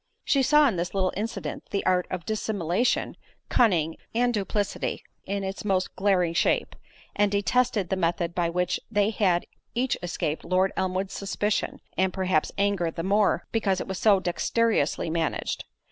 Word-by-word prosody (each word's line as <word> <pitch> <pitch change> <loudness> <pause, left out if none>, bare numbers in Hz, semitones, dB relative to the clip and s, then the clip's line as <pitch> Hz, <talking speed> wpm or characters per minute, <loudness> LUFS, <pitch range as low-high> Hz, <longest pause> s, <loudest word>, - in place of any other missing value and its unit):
She 275 - +3
saw 300 +2 +5
in 215 -9 0
this 175 +3 -3
little 185 -1 +1
incident 215 +4 -4
the 200 - -2
art 180 -1 +2
of 180 -3 -4
dissimulation, 215 0 0 0.3
cunning, 170 -9 +2 0.2
and 245 +1 +2
duplicity 205 -1 -2 0.2
in 200 0 -2
its 195 +1 -4
most 190 -3 0
glaring 185 -4 +2
shape; - - +1 0.4
and 205 -1 +2
detested 205 -1 +1
the - - +1
method 170 -1 0
by 175 -1 0
which 180 +1 0
they 205 -1 +2
had 185 -5 +1 0.3
each 255 +2 +1
escaped 165 -3 -2
Lord 185 +2 +2
Elmwood's 190 +1 -1
suspicion, 205 +1 -2 0.2
and 190 0 +3
perhaps 185 -5 0
anger, 200 -4 +1
the 165 0 -5
more, 200 +2 +2
because 200 -4 +1
it - - -5
was 190 -1 -4
so 205 -3 +5
dexterously 185 -2 0
managed. 165 -1 -2
190 Hz, 160 wpm, -26 LUFS, 180-210 Hz, 0.4 s, saw